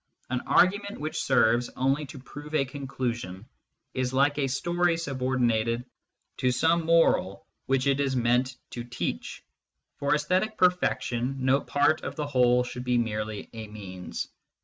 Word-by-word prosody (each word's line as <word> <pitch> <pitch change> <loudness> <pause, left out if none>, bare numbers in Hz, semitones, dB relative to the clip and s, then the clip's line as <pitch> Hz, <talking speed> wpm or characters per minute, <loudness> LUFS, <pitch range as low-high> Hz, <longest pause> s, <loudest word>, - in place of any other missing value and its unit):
An 125 -1 0
argument 200 +3 +3
which 155 +1 -3
serves 120 -2 +3
only 135 +3 +1
to 140 - -10
prove 145 +3 -8
a 140 -3 +3
conclusion 125 -8 -4 0.5
is 130 0 -1
like 145 +2 +3
a 135 - +1
story 175 +5 +1
subordinated 125 -5 0 0.5
to 125 - +2
some 165 +5 +2
moral 100 - +3 0.2
which 135 0 +2
it 140 0 +2
is 135 -2 +1
meant 125 +1 +2 0.2
to 120 - -5
teach: 125 +1 -4 0.5
for 140 +1 +2
aesthetic 185 +8 0
perfection 135 -8 +1
no 135 +1 +4
part 145 +2 +2
of - - -5
the 150 - -2
whole 125 -3 +3
should 125 0 -6
be 125 -1 +1
merely 110 -2 -2
a 110 -1 -7
means. 95 -4 -6
130 Hz, 150 wpm, -27 LUFS, 120-145 Hz, 0.5 s, no